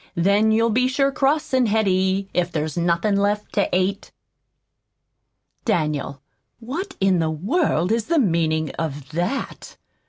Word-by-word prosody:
Then 200 +5 +3
you'll 225 0 +2
sure 275 +1 +1
be - - -18
cross 290 +3 0
an' 255 -2 +3
heady, 195 -2 +1
If 180 0 0
there's 155 -2 -3
nothin' 175 +4 +1
left 205 +1 -1
to 200 - +1
ate." 185 +2 -1 1.5
"Daniel, 150 - -1 0.4
what 330 - -6
in 190 -2 +3
the 160 -1 0
world 180 - 0
is 225 -1 0
the 335 +1 +1
meaning 160 - +1
of 145 -4 -4
that?" 175 - -4
195 Hz, 135 wpm, -22 LUFS, 170-230 Hz, 1.5 s, Then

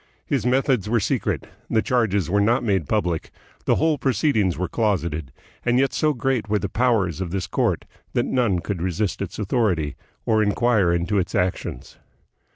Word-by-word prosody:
His - - 0
methods 125 -5 +2
were 120 +1 +3
secret, 100 - -1 0.2
the 110 - +2
charges 105 -7 +1
were 100 +4 +2
not 115 +5 +2
made 95 - 0
public, 90 -7 0 0.4
the - - +3
whole 155 -3 +1
proceedings 110 - +1
were 90 - -1
closeted, 85 - -1 0.3
and 120 0 +2
yet 135 0 +2
so 155 - +2
great 130 -4 -1
were 105 - +2
the - - -3
powers 105 - +1
of 90 - -2
this 95 0 -2
court - - 0 0.3
that - - +1
none 110 -9 +1
could 95 -3 -4
resist 90 +3 -1
its 100 - -4
authority, 95 - 0 0.3
or 110 -1 +3
inquire 105 -3 +2
into 85 +4 +1
its 90 - -2
actions. 90 0 -2
105 Hz, 170 wpm, -23 LUFS, 90-120 Hz, 0.4 s, were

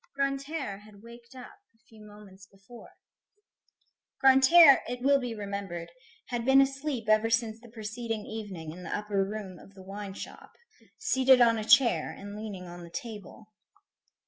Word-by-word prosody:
Grantaire 275 -5 -3
had 210 0 -18
waked 235 +2 -15
up 260 +11 -12 0.2
a - - -32
few 220 -1 -20
moments 205 -2 -15
before. 195 +5 -16 1.3
Grantaire, 270 +3 +7
it 245 +1 -6
will 280 +1 +4
be 245 -3 -5
remembered, 200 -5 -6 0.4
had 240 -2 -3
been 265 +2 +5
asleep 270 -3 -1
ever 215 +1 +3
since 225 -1 -1
the 235 0 -16
preceding 220 0 -6
evening 195 -8 -7
in 175 +3 -11
the 180 - -4
upper 205 -2 -1
room 195 -2 -7
of 195 - -17
the 190 - -13
wine 195 0 -8
shop, - - -10 0.4
seated 265 - +3
on 230 -2 +4
a - - -4
chair 265 +2 +4
and 205 +1 -9
leaning 210 -4 -7
on 175 0 -10
the 170 - -11
table. 215 0 -9
220 Hz, 160 wpm, -28 LUFS, 200-255 Hz, 1.3 s, Grantaire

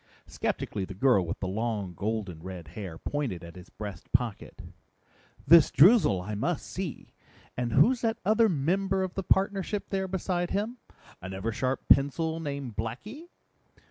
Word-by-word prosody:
Skeptically 100 - -3
the 95 - -7
girl 105 -2 +4
with - - -5
the 95 - -1
long, 105 -2 -2
golden 100 -3 -3
red 90 -3 -8
hair 90 -1 -7
pointed 125 - -3
at 85 -1 -10
his 90 -1 -12
breast 105 -2 -8
pocket. 120 -3 -2 0.8
"This 165 -3 +8
Droozle 150 - +5
I 105 - -4
must 105 - -2
see. - - -6 0.4
And 120 -1 -2
who's 245 +1 +4
that 225 -1 0
other 220 +2 +4
member 190 +5 0
of 185 -1 -4
the 195 - -2
partnership 195 +2 0
there 190 -1 -1
beside 180 -1 -2
him? 215 +5 -2 0.4
An 95 +1 -6
Eversharp 115 +7 -2
pencil 160 +4 +3
named 140 -7 -5
Blackie?" 200 - -6
130 Hz, 150 wpm, -28 LUFS, -, 0.8 s, This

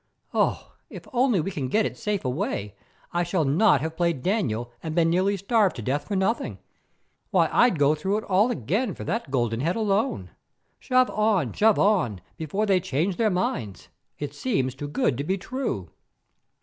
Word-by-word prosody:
Oh, - - 0 0.2
if - - -10
only 245 -5 +3
we 195 - -3
can 140 -7 -3
get 215 +11 +2
it - - -3
safe 210 -7 -3
away, 105 -5 -2 0.4
I 175 - +1
shall 175 -2 0
not 145 - +4
have 160 +1 -3
played 170 -6 0
Daniel 120 - -1
and 160 -1 -5
been 165 -1 +3
nearly 190 +3 +2
starved 200 0 +2
to 120 - -6
death 140 +5 -2
for 205 - -2
nothing. 225 +8 0 0.7
Why, - - +3
I'd 240 -7 +4
go 145 +1 +4
through 190 +7 -1
it 215 - -4
all 200 +5 +3
again 195 - -1
for - - -7
that 205 - -3
golden 120 -4 0
head 165 +7 0
alone. 205 - 0 0.5
Shove 255 0 +2
on, 205 - +1
shove 220 0 +4
on, 180 - +2 0.2
before 180 +7 -2
they 195 -3 +3
change 180 +1 -1
their 225 -2 +2
minds; 120 - -3 0.3
it 145 - -5
seems 135 - -1
too 145 +2 -6
good 140 -3 0
to - - -1
be 190 +6 -1
true." 195 - -4
175 Hz, 185 wpm, -25 LUFS, 140-210 Hz, 0.7 s, not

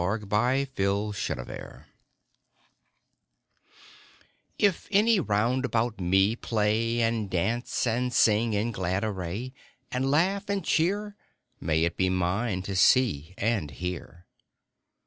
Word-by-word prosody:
MAY 105 +7 +1
IT 135 -1 -10
BE 95 - +1
MINE 100 - -4 2.7
IF 200 -4 +1
any 210 +1 +4
round 120 - +1
about 115 -3 -1
me 95 +5 +3
play, 115 +1 0
And 115 -3 0
dance 110 +10 -1
and 125 +2 0
sing 110 -1 +3
in 105 +3 0
glad 95 -1 -2
array, 105 +4 -4 0.4
And 130 +1 0
laugh 185 +8 +1
and 200 -4 -1
cheer, 200 +5 0 0.4
May 80 0 +1
it 85 0 -1
be 95 0 +2
mine 95 +2 -1
to 95 0 -4
see 95 - +3
and 105 -8 0
hear. 90 +3 -7
110 Hz, 115 wpm, -27 LUFS, 95-125 Hz, 2.7 s, any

